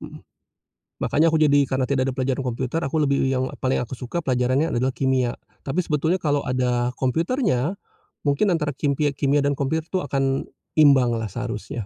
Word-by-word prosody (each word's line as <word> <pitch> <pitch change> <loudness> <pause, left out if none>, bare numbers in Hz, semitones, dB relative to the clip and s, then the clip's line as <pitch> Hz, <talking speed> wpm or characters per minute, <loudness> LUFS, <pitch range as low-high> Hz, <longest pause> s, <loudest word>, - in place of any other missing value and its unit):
Mhm, - - -11 0.7
makanya 160 +3 +2
aku 160 - +2
jadi 145 -2 +4
karena 130 -1 0
tidak 135 -1 0
ada 130 - -3
pelajaran 130 +1 0
komputer 130 +5 -2
aku 150 +1 -1
lebih 140 -2 +2
yang 130 -1 0 0.2
paling 130 0 +1
aku 125 +1 -4
suka 125 +6 -5
pelajarannya 130 +4 +1
adalah 130 +2 +1
kimia, 130 -2 0 0.2
tapi 165 +6 -2
sebetulnya 160 +4 +1
kalau 145 -4 0
ada 125 -1 0
komputernya 165 - 0 0.5
mungkin 145 +8 +2
antara 150 -4 0
kimpia 140 +1 0
kimia 140 +1 +1
dan 140 - +2
komputernya 155 +4 -2
tuh 185 - +1
akan 135 -1 0 0.2
imbang 135 -6 +5
lah 115 -2 -3
seharusnya. 115 0 -5
135 Hz, 170 wpm, -23 LUFS, 130-150 Hz, 0.7 s, imbang